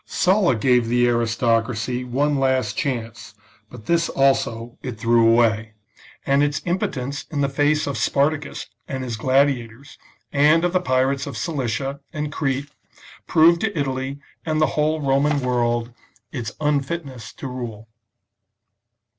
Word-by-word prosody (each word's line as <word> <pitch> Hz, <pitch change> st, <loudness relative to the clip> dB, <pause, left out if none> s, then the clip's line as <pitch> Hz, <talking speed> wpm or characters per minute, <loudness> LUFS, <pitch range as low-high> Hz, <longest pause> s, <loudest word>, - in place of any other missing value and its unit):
Sulla 185 Hz, -, +2 dB
gave 125 Hz, +1 st, +2 dB
the 120 Hz, +1 st, +3 dB
aristocracy 115 Hz, +1 st, 0 dB
one 140 Hz, +3 st, 0 dB
last 130 Hz, -5 st, +1 dB
chance, 115 Hz, -7 st, -4 dB, 0.3 s
but 120 Hz, -3 st, -12 dB
this 170 Hz, -1 st, +1 dB
also 130 Hz, -4 st, +1 dB
it 125 Hz, -4 st, -6 dB
threw 115 Hz, 0 st, +4 dB
away; 110 Hz, -2 st, +2 dB, 0.5 s
and 140 Hz, +1 st, +3 dB
its 145 Hz, 0 st, +1 dB
impotence 140 Hz, -6 st, -2 dB
in 145 Hz, -2 st, -2 dB
the 140 Hz, -, +2 dB
face 145 Hz, +2 st, +1 dB
of 140 Hz, -, -3 dB
Spartacus 145 Hz, +1 st, 0 dB, 0.2 s
and 130 Hz, -1 st, -4 dB
his 120 Hz, -3 st, -4 dB
gladiators, 130 Hz, 0 st, 0 dB, 0.3 s
and 150 Hz, +4 st, +4 dB
of 175 Hz, -, 0 dB
the 185 Hz, -, +2 dB
pirates 130 Hz, -2 st, +1 dB
of -, -, -6 dB
Cilicia 135 Hz, -3 st, -2 dB
and 150 Hz, -1 st, -4 dB
Crete, 140 Hz, -1 st, -2 dB, 0.6 s
proved 170 Hz, +1 st, +5 dB
to 210 Hz, -5 st, -1 dB
Italy 135 Hz, 0 st, -3 dB, 0.2 s
and 155 Hz, -1 st, -1 dB
the 155 Hz, -, +5 dB
whole 155 Hz, +1 st, +1 dB
Roman 140 Hz, +1 st, +2 dB
world 120 Hz, -2 st, 0 dB, 0.4 s
its 120 Hz, -4 st, -5 dB
unfitness 140 Hz, -5 st, -2 dB
to -, -, -10 dB
rule. 120 Hz, -4 st, -6 dB
135 Hz, 140 wpm, -22 LUFS, 120-145 Hz, 0.6 s, proved